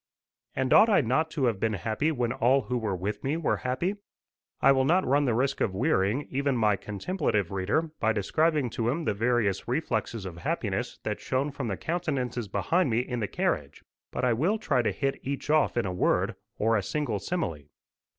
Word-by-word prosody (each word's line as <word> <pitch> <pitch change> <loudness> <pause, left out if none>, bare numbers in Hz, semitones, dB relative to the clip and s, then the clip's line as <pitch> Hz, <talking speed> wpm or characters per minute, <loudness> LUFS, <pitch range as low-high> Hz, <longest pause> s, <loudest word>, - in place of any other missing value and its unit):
And 130 -1 +1
ought 225 - +7
I 205 - +5
not 140 +6 +1
to 145 -5 -1
have 115 -5 0
been 110 +1 0
happy 110 - -1
when 120 -5 -1
all 130 +4 +3
who 125 0 -2
were 105 -4 -1
with 100 +4 -4
me 140 +4 0
were 165 - 0
happy? 170 +11 -2 0.6
I - - +6
will 130 -1 +3
not 175 +7 +3
run 140 +2 +3
the 120 -4 +1
risk 135 +3 0
of 95 - 0
wearying 110 +1 +1
even 140 -1 0
my 105 -3 +3
contemplative 105 - -2
reader 100 - 0
by 110 - +2
describing 140 - +1
to 115 0 -1
him 155 +5 -1
the - - +1
various 110 -2 0
reflexes 115 -5 -2
of 85 -3 -7
happiness - - -2
that - - -2
shone 135 +3 -1
from 135 -3 -4
the 100 -3 -2
countenances 140 -9 -2
behind 125 - +1
me 115 +1 +2
in 125 -1 -4
the 105 - -1
carriage, 70 -7 -2 0.3
but - - -1
I 125 - +3
will 170 - +1
try 135 - +1
to 120 - 0
hit 135 -1 -2
each 140 +2 -3
off 155 -5 +3
in 120 - +1
a 90 - -2
word, 90 - +1 0.2
or 115 +2 +2
a 105 - +2
single 120 -1 -2
simile. 90 - -3
125 Hz, 205 wpm, -28 LUFS, 105-145 Hz, 0.6 s, ought